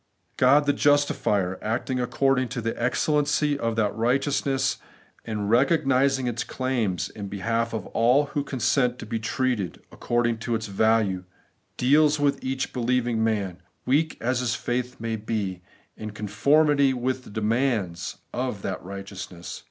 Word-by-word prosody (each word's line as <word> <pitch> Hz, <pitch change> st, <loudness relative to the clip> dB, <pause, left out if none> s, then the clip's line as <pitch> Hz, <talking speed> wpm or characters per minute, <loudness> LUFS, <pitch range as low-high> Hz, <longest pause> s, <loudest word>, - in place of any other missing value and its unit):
God 140 Hz, +3 st, +5 dB
the 145 Hz, -, +3 dB
justifier, 105 Hz, -11 st, +2 dB
acting 120 Hz, +4 st, -2 dB
according 130 Hz, +1 st, +1 dB
to 120 Hz, -, -4 dB
the 115 Hz, 0 st, -1 dB
excellency 145 Hz, +3 st, +1 dB
of 115 Hz, -2 st, -1 dB
that 105 Hz, -3 st, 0 dB
righteousness, 135 Hz, +3 st, +1 dB, 0.5 s
and 105 Hz, -3 st, -3 dB
recognising 135 Hz, +1 st, +3 dB
its 120 Hz, -1 st, -1 dB
claims 120 Hz, -9 st, -1 dB
in 100 Hz, -2 st, -7 dB
behalf 115 Hz, +4 st, -1 dB
of 110 Hz, -, -4 dB
all 125 Hz, +6 st, +3 dB
who 145 Hz, -, 0 dB
consent 125 Hz, -1 st, +1 dB
to -, -, -8 dB
be 115 Hz, -2 st, -3 dB
treated 115 Hz, -5 st, -1 dB
according 120 Hz, -1 st, 0 dB
to 115 Hz, +1 st, -1 dB
its 110 Hz, 0 st, -3 dB
value, 100 Hz, -2 st, +1 dB, 0.5 s
deals 150 Hz, +3 st, +4 dB
with 140 Hz, -1 st, +1 dB
each 130 Hz, 0 st, -2 dB
believing 120 Hz, -2 st, 0 dB
man, 100 Hz, -5 st, -1 dB, 0.2 s
weak 150 Hz, +5 st, +1 dB
as 125 Hz, +2 st, 0 dB
his 120 Hz, -2 st, 0 dB
faith 125 Hz, +1 st, -3 dB
may 115 Hz, 0 st, -2 dB
be, 105 Hz, -4 st, -3 dB, 0.3 s
in 110 Hz, -, -6 dB
con 105 Hz, 0 st, -6 dB
formity 140 Hz, +5 st, +3 dB
with 130 Hz, +1 st, -2 dB
the -, -, -13 dB
demands 105 Hz, -5 st, -1 dB, 0.2 s
of 125 Hz, -5 st, -3 dB
that 95 Hz, -, -4 dB
righteousness. 100 Hz, -2 st, -7 dB
120 Hz, 145 wpm, -25 LUFS, 110-135 Hz, 0.5 s, God